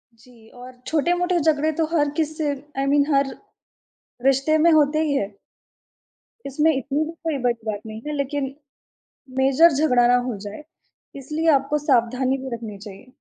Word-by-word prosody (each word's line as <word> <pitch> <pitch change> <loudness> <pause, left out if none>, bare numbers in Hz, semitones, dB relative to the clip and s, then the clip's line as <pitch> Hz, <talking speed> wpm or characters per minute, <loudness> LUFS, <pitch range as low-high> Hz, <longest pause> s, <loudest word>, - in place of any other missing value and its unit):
जी, 230 -1 -20
और 250 +1 -12 0.2
छोटे-मोटे 350 +3 +1
झगड़े 310 0 +1
तो - - +3
हर 290 -1 +2
किसी 310 0 -1 0.3
आई 275 - 0
मीन 285 -1 +4
हर 275 -1 +1 0.9
रिश्ते 275 +4 +3
में 335 +2 +5
होते 310 0 +3
ही 295 -3 0
हैं। 205 -5 -2 1.1
इसमें 300 +4 +2
इतनी 275 +3 -1
भी 320 - -6
कोई 320 -4 -1
बड़ी 235 -2 -1
बात 205 -1 -4
नहीं 220 0 -8
है 300 - -3
लेकिन 280 -1 -2 0.9
मेजर 275 +5 +5
झगड़ा 250 -5 +3
ना 245 - +4
हो 230 - -3
जाए 210 +9 -9 0.6
इसलिए 310 +4 -1
आपको 285 +2 -2
सावधानी 255 0 +1
भी 265 0 -7
रखनी 215 -3 -8
चाहिए। 205 +3 -12
275 Hz, 160 wpm, -22 LUFS, 245-310 Hz, 1.1 s, में